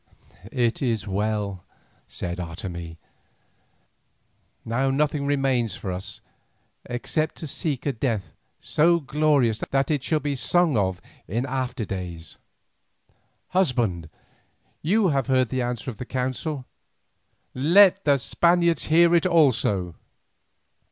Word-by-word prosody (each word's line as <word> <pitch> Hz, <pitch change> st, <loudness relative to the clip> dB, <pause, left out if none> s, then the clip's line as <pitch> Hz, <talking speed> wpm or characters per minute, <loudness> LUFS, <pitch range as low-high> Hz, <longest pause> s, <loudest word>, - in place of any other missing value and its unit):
"It 120 Hz, -3 st, 0 dB
is 115 Hz, -5 st, -1 dB
well," 100 Hz, -2 st, -2 dB, 0.4 s
said 85 Hz, 0 st, -5 dB
Otomie; 85 Hz, -1 st, -6 dB, 1.7 s
"now 130 Hz, +4 st, 0 dB
nothing 140 Hz, +1 st, 0 dB
remains 135 Hz, -7 st, +1 dB
for 95 Hz, -, -5 dB
us 90 Hz, +1 st, -6 dB, 0.7 s
except 155 Hz, +6 st, -2 dB
to -, -, -7 dB
seek 145 Hz, -2 st, -3 dB
a 140 Hz, -, 0 dB
death 115 Hz, -5 st, -2 dB, 0.3 s
so 170 Hz, +3 st, +3 dB
glorious 140 Hz, -6 st, +2 dB
that 135 Hz, +2 st, +1 dB
it 145 Hz, -4 st, 0 dB
shall 155 Hz, -, +1 dB
be 145 Hz, -1 st, -2 dB
sung 170 Hz, +3 st, +2 dB
of 95 Hz, -4 st, 0 dB, 0.3 s
in 115 Hz, +8 st, -1 dB
after 130 Hz, -3 st, -3 dB
days. 85 Hz, -4 st, -7 dB, 1.1 s
Husband, 120 Hz, -, 0 dB, 0.7 s
you 195 Hz, +4 st, +2 dB
have 135 Hz, -4 st, 0 dB
heard 130 Hz, -3 st, +2 dB
the 130 Hz, -1 st, -1 dB
answer 120 Hz, +1 st, -3 dB
of 110 Hz, -, -13 dB
the 125 Hz, -, -6 dB
council. 130 Hz, +2 st, -3 dB, 0.9 s
Let 190 Hz, +8 st, +5 dB
the 140 Hz, -2 st, +4 dB
Spaniards 170 Hz, +4 st, +2 dB
hear 170 Hz, +2 st, +5 dB
it 170 Hz, +1 st, +4 dB
also." 115 Hz, -, +2 dB
130 Hz, 120 wpm, -24 LUFS, 105-150 Hz, 1.7 s, Let